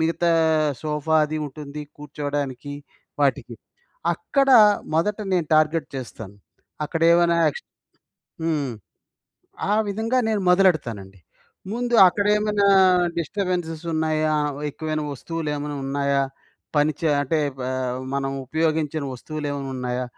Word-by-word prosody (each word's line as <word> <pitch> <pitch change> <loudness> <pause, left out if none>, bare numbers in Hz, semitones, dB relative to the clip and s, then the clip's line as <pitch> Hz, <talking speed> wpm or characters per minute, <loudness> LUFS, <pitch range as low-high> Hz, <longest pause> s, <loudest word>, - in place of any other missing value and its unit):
మిగతా 165 +1 +1 0.5
సోఫా 155 +1 0
అది 155 +1 -4
ఉంటుంది. 150 +1 -8
కూర్చోవడానికి, 145 -2 -4 0.5
వాటికి. 140 -2 0 0.6
అక్కడ 275 -1 0 0.5
మొదట 200 +6 +1 0.2
నేను 170 -4 +1
టార్గెట్ 155 +1 +2
చేస్తాను. 110 -5 -8 0.5
అక్కడేవనా 170 +2 +3
ఎక్స్ - - -9 0.8
హ్మ్. 150 -5 -1 1.0
ఆ - - +3 0.2
విధంగా 225 +5 0
నేను 215 -2 0
మొదలెడతానండి. 120 - +1 0.5
ముందు 240 +1 -1
అక్కడేమనా 210 +1 +2 0.5
డిస్టబెన్సెసున్నాయా? 165 -4 -1 0.4
ఎక్కువైన 155 +1 -3
వస్తువులేమైనా 150 0 -4
ఉన్నాయా? 140 0 0 0.5
పని 150 +1 +3
చ - - -17 0.2
అంటే 155 +3 0 0.2
బ - - -5 0.5
మనం 135 0 -1 0.2
ఉపయోగించని 155 0 -1
వస్తువులేమైనా 145 0 -5
ఉన్నాయా? 125 0 -2
155 Hz, 95 wpm, -23 LUFS, 140-170 Hz, 1.0 s, అక్కడేవనా